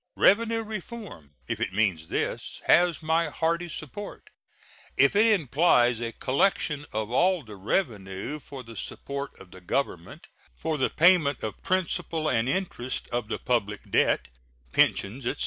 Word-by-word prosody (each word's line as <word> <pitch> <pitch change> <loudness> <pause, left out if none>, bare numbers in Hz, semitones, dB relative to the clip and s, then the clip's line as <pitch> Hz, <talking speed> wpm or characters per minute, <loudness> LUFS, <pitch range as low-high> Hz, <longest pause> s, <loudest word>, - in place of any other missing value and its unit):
Revenue 225 +2 +4
reform, 210 - -8
if - - -3
it - - -2
means 95 -7 +1
this, - - -3
has 175 -3 +4
my 160 0 +2
hearty 170 +3 -1
support. 195 +7 -8 0.7
If 140 +7 +5
it 215 -1 +5
implies 125 -5 +3
a 115 -1 -2
collection 145 - 0
of 110 +1 -3
all 180 +5 +3
the 110 -3 -11
revenue 100 - -2
for 135 -2 -9
the 115 -1 -12
support 140 +6 -6
of 90 - -14
the 95 - -13
Government, 95 - -3 0.3
for 160 -2 -2
the 130 - +2
payment 160 -5 +4
of 110 -2 -5
principal 175 -3 -1
and 120 -3 +1
interest 135 -7 -3
of 120 -2 -2
the 115 - -2
public 105 -4 -2
debt, - - +2 0.4
pensions, 120 +6 +1
etc. - - -2
140 Hz, 145 wpm, -27 LUFS, 115-175 Hz, 0.7 s, If